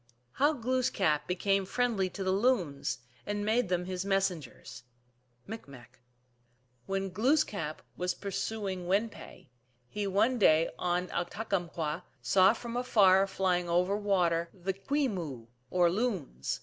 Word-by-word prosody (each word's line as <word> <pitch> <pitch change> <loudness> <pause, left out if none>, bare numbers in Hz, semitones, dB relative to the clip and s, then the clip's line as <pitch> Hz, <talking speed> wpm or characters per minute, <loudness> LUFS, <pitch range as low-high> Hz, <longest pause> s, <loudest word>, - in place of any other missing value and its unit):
1 120 - -41 0.3
How 290 +3 +4
Glooskap 230 - 0
became 195 +2 +1
friendly 210 -2 0
to 195 +2 -5
the 185 - +1
Loons, 190 - 0 0.2
and 205 0 -3
made 220 -1 +2
them 180 -1 0
his 185 0 -3
Messengers. 185 -10 -2 0.6
(Micmac.) 135 - -10 0.9
When 195 0 -2
Glooskap 210 - 0
was 180 0 -1
pursuing 195 -2 -3
Win 205 +5 +2
pe, 175 - -13 0.4
he 205 +9 -3
one 220 +6 +2
day 160 -4 +4
on 180 0 0
Uktukamkw 175 -4 -2 0.2
saw 185 - +5
from 235 0 -7
afar 195 -6 +4
flying 180 -2 0
over 180 +3 +2
water 175 -5 +1
the 190 +1 -3
Kwe 280 +9 0
moo 165 - -4
(M.), 115 - -21 0.2
or 175 -2 +3
Loons. 185 - -2
190 Hz, 135 wpm, -30 LUFS, 175-210 Hz, 0.9 s, saw